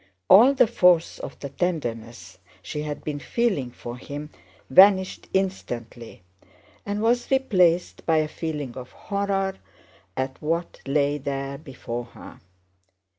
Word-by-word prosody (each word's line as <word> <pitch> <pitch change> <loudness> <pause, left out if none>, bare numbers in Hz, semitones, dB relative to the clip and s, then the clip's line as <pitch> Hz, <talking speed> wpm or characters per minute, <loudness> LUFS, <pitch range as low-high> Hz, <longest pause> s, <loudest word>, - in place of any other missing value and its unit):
All 245 +8 +8
the 250 - +6
force 180 -7 +3
of - - -8
the 140 - -7
tenderness 115 - -4 0.2
she 150 - -4
had 150 -1 -5
been 150 -1 -4
feeling 195 - -1
for 120 0 -8
him 145 +3 -7 0.4
vanished 190 +5 +5
instantly 120 - -4 0.6
and 205 +1 -2
was 240 +2 +1
replaced 185 -10 +2
by 160 -1 +4
a 155 -1 +2
feeling 150 -5 -5
of 130 -1 -9
horror 195 -1 -2 0.6
at 130 0 -3
what 165 +3 -2
lay 145 +1 +1
there 140 0 -4
before 125 -5 -6
her. 115 - -13
150 Hz, 125 wpm, -24 LUFS, 130-190 Hz, 0.6 s, All